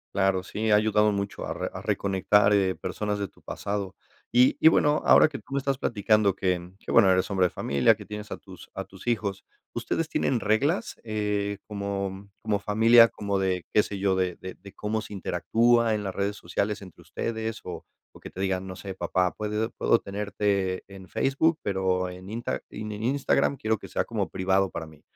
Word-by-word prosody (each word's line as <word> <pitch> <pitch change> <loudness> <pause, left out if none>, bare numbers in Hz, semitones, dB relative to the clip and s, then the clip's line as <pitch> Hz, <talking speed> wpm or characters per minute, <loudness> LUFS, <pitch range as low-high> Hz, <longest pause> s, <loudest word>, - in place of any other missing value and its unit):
Claro, 95 -2 +2
sí, 110 +3 -3
ha 105 - +6
ayudado 105 0 +3
mucho 100 0 -3
a - - -4
re - - -4
a - - -6
reconectar, 100 +1 +2
eh, 95 -2 +2
personas 105 -1 -3
de 100 - -2
tu - - -25
pasado. 100 -2 -4 0.4
Y 125 +2 +5
y 160 - +6
bueno, 150 -2 +4
ahora - - +7
que 150 -3 -7
tú - - -12
me - - +1
estás 135 -1 -1
platicando 105 -2 +2
que 90 -2 -1
que - - -7
bueno 110 -5 +6
eres 95 +2 +1
hombre 95 -2 +3
de - - -7
familia, 90 +11 +2
que 105 -1 -11
tienes 105 0 -8
a - - -4
tus - - -14
a - - -3
tus - - -15
hijos, 105 -5 -1 0.3
¿ustedes 165 -1 -2
tienen 125 - +1
reglas?, 135 - 0
eh, 105 -2 -1
como 100 -1 -4
como 105 -2 0
familia, 115 +3 +6
como 100 -3 -2
de, 95 -2 -1
qué 105 - +6
sé 100 - -5
yo, 95 -1 +1
de 90 -2 0
de 95 0 -8
de 100 +1 -14
cómo 110 +1 -2
se 105 - -9
interactúa 115 +5 +2
en 105 - -3
las 95 -2 -3
redes 100 +2 -1
sociales 100 +4 -2
entre 95 -3 -14
ustedes 110 -1 -4
o 90 - -7 0.3
o - - -16
que - - -9
te - - -11
digan: 95 -1 -1
"No 95 - -7
sé, 95 +1 -7
papá, 90 -1 0
puede 105 +1 -2
puedo - - +2
tenerte 100 -2 -1
en 95 -1 -12
Facebook, 155 +4 +1
pero 95 -2 0
en 90 +2 -9
Insta 115 +2 -3
en 105 0 -6
Instagram 135 +5 +1
quiero 110 -2 0
que - - -10
sea - - -1
como - - -2
privado 95 +1 +1
para 80 - -6
mí, 80 -1 -16
100 Hz, 205 wpm, -26 LUFS, 95-110 Hz, 0.4 s, ahora